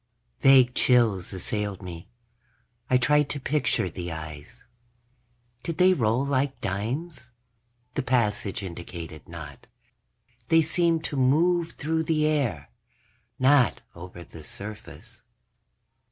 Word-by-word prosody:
_ - - -32
Vague 130 -2 +6
chills 115 -9 +2
assailed 100 +1 -3
me. 85 -2 -8 0.8
I 130 - +5
tried 150 +3 +3
to 145 - -2
picture 140 -7 0
the 90 0 -6
eyes. 80 -2 -9 1.0
Did 170 -2 -4
they 185 +1 +6
roll 120 -3 +1
like 140 0 0
dimes? 120 - -4 0.6
The - - -1
passage 110 -4 0
indicated 85 -3 -8
not; 75 -5 -10 0.8
they 165 0 +5
seemed 165 0 +1
to 145 - -3
move 165 +6 +2
through 160 +2 -1
the 155 -1 +1
air, 125 - -1 0.7
not 130 -1 +4
over 85 0 -10
the 80 -2 -12
surface. 105 +7 -9
125 Hz, 115 wpm, -26 LUFS, 90-150 Hz, 1.0 s, Vague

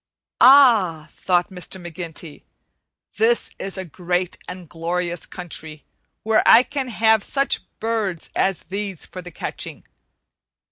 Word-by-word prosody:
"Ah!" 220 - +6
thought 180 +1 +1
Mr. 190 +1 -7
McGinty, 170 -2 -7 0.8
"this 465 +2 +2
is 195 0 -4
a 190 - -4
great 180 +1 -2
and 180 -1 -8
glorious 175 +1 -3
country, 160 -4 -6 0.4
where 220 0 +3
I 240 - +7
can 275 -1 -4
have 220 -2 +3
such 275 0 0 0.2
birds 215 -7 -2
as 190 -2 0
these 195 -2 -5
for 185 - -9
the 180 - -9
catching. 165 - -6
185 Hz, 125 wpm, -22 LUFS, 175-220 Hz, 0.8 s, I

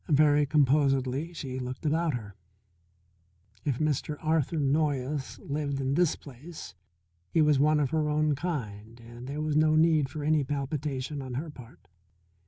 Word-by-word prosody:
Very 145 -1 +4
composedly 140 +1 +2
she 130 -6 -5
looked 125 +3 -6
about 160 -1 +1
her. 105 -4 -7 1.3
If 140 -5 0
Mr. 150 0 -1
Arthur 160 0 0
Noyes 140 -1 0
lived 140 -1 -3
in 135 0 0
this 175 +1 +3
place, 145 - -10 0.6
he - - +1
was 150 -2 +4
one 150 +1 +4
of 140 -3 0
her 155 -1 +1
own 150 0 +2
kind 115 - -5
and 120 +2 -11
there 145 +2 -4
was 155 -1 -1
no 155 0 +4
need 155 -3 +4
for 150 - -6
any 155 -1 +3
palpitation 140 0 -3
on 130 -2 -6
her 155 +4 -4
part. 125 -4 -15
145 Hz, 155 wpm, -28 LUFS, 130-155 Hz, 1.3 s, Very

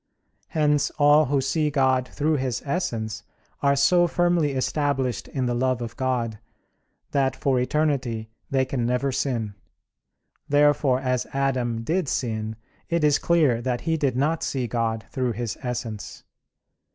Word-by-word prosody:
Hence 150 -2 +2
all 150 +1 +6
who 140 +1 +1
see 150 +3 +1
God 130 -3 +2
through 155 +1 0
His 130 -3 -2
Essence 115 - -2 0.4
are 140 0 +3
so 175 +6 +4
firmly 175 -4 +1
established 135 -2 -1
in 130 -2 -2
the 120 - 0
love 130 +1 +1
of 115 -2 -6
God, 120 -5 -1 0.7
that 135 -2 +1
for 130 -1 +1
eternity 125 -5 0 0.2
they 135 -1 +2
can 130 -2 -2
never 125 +3 0
sin. 120 -6 -2 1.0
Therefore, 145 -2 +3
as 125 -2 -1
Adam 125 -4 0
did 170 +5 0
sin, 110 -3 -2 0.3
it 170 -2 +1
is 150 -2 +4
clear 150 -9 +3
that 125 0 -2
he 165 0 0
did 140 -5 0
not 155 +5 +1
see 130 -3 -1
God 115 -1 -2
through 125 -2 -1
His 115 0 -3
Essence. 120 -5 -5
130 Hz, 145 wpm, -24 LUFS, 120-145 Hz, 1.0 s, all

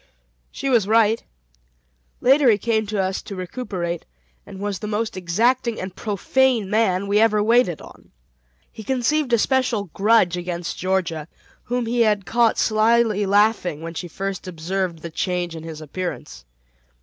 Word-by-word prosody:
She - - -5
was 235 -7 +3
right. 225 0 +3 1.0
Later 270 +1 +5
he 215 - +5
came 220 0 0
to 210 0 -2
us 190 0 -1
to 200 - -8
recuperate, 180 -3 -4 0.4
and 190 - -10
was 200 -2 -3
the 210 - -5
most 220 +2 -2
exacting 230 +7 0
and 185 0 -6
profane 220 +1 +1
man 200 -3 +2
we 200 +1 +2
ever 215 -2 +3
waited 225 -7 +2
on. - - -15 0.6
He 220 - -10
conceived 265 +4 0
a 235 - +5
special 230 - 0
grudge 200 -4 +3
against 175 -1 -4
Georgia, 180 -4 -1 0.4
whom 245 0 -1
he 235 +1 0
had 210 -4 +2
caught 235 +3 +2
slyly 215 -1 +2
laughing 200 -6 +2
when 165 0 -6
she 175 +2 -5
first 195 +2 -5
observed 175 0 -3
the 170 - -6
change 175 0 -2
in 160 - -7
his 160 -1 -8
appearance. 145 - -6
205 Hz, 155 wpm, -22 LUFS, 180-230 Hz, 1.0 s, Later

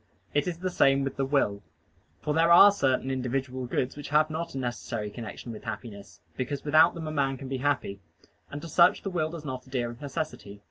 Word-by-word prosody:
It 145 +2 +1
is 175 -2 -2
the 185 +1 -3
same 135 -4 +3
with 135 - -3
the 135 - 0
will. 120 -8 +1 0.6
For 150 - 0
there 165 +2 +3
are 200 +4 +9
certain 135 -8 0
individual 130 0 -2
goods 125 +1 -1
which 145 -1 -8
have 155 +1 +3
not 160 -1 -4
a - - -3
necessary 120 -4 -4
connection 115 +2 -7
with 110 - -9
happiness, 105 -3 -8 0.2
because 135 +3 -4
without 155 0 +5
them 160 -2 -5
a - - -3
man 135 -3 0
can 135 - -8
be 135 0 -3
happy: 130 -7 -1 0.5
and 145 +1 -7
to - - -6
such 170 +2 +4
the 195 - -3
will 160 -3 0
does 160 -2 -8
not 130 -2 -6
adhere 125 -3 -2
of 120 - -13
necessity. 145 -9 -5
135 Hz, 220 wpm, -28 LUFS, 125-155 Hz, 0.6 s, are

